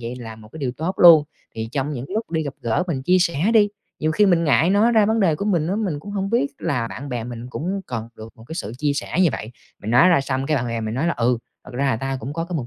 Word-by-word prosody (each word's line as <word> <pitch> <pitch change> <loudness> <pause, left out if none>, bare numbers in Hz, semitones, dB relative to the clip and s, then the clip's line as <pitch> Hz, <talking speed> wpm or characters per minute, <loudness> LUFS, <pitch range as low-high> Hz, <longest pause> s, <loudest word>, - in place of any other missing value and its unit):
vậy 120 +1 -5
là 110 -2 -8
một 110 -1 -14
cái - - -9
điều 135 -4 -2
tốt 170 +5 -2
luôn. 165 -4 +8 0.3
Thì 110 0 -4
trong 140 +2 -2
những 125 -2 -5
lúc 220 -1 -3
đi 160 -1 0
gặp 140 -2 -5
gỡ, 115 +7 0
mình 140 -7 -2
chia 180 +6 +3
sẻ 170 +2 +1
đi. 210 -2 +6 0.3
Nhiều 155 - 0
khi 210 +6 +4
mình 175 -3 +3
ngại 160 +3 +3
nói 215 +4 +4
ra 215 -2 +4
vấn 225 +1 +1
đề 175 -6 +3
của 175 - -4
mình 175 -7 +1
á, 195 - 0
mình 190 -10 -2
cũng 205 - -9
hông 195 0 -2
biết 245 +4 +2
là 120 -4 -1
bạn 140 +4 -7
bè 120 -3 -3
mình 120 0 -7
cũng 185 +9 -3
cần 115 -2 -5
được 110 +1 -9
một 110 - -15
cái 160 - -6
sự 110 -9 -5
chia 145 0 +1
sẻ 140 - -4
như 180 - +5
vậy. 110 - -5 0.3
Mình 105 - -4
nói 125 +9 +6
ra 175 -6 +4
xong, 135 0 -2
cái 150 0 +1
bạn 125 - -1
bè 115 -1 -3
mình 110 0 -3
nói 140 +7 0
là 170 - +2
"Ừ, 120 0 +1 0.3
thật - - -11
ra 135 - -1
là 130 - +1
tao 135 +2 -3
cũng 135 - -6
có 165 +2 -3
cái 170 -1 -4
mục 130 - -4
150 Hz, 315 wpm, -22 LUFS, 125-180 Hz, 0.3 s, luôn